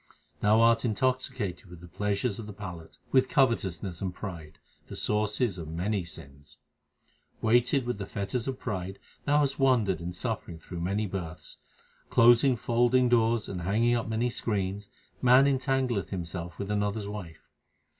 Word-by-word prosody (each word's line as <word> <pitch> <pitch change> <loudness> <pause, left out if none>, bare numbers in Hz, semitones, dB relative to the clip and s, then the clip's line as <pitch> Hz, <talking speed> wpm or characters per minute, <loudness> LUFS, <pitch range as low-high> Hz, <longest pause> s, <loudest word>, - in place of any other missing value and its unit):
Thou 105 +2 +4
art 115 0 +4
intoxicated 125 -4 -1
with 90 -1 -11
the 90 - -12
pleasures 100 +5 -1
of 110 - -7
the 105 - -7
palate, 90 -5 -9
with 130 -1 +4
covetousness 95 - 0
and 95 -2 -1
pride 85 -5 -8 0.3
the - - -8
sources 105 -1 0
of 80 - -6
many 90 +5 -1
sins. 70 -4 -12 0.8
Weighted 120 +3 +3
with 120 -4 -3
the 100 - -5
fetters 100 +6 -3
of 130 -1 -2
pride 95 -3 -4 0.3
thou 145 +1 +4
hast 140 -1 -1
wandered 115 -10 +3
in 85 +1 -4
suffering 85 -1 -4
through 85 +1 -8
many 100 +5 0
births. 90 -4 -6 0.5
Closing 120 +3 +6
folding 120 +2 +2
doors 115 -1 +2
and 90 -2 -5
hanging 110 +7 +2
up 120 -2 0
many 115 +2 0
screens 100 -3 -3 0.3
man 130 +2 +6
entangleth 130 - 0
himself 85 -2 -5
with 100 +1 -4
another 105 +1 0
s - - -6
wife. 100 -6 -8
105 Hz, 155 wpm, -28 LUFS, 90-120 Hz, 0.8 s, Closing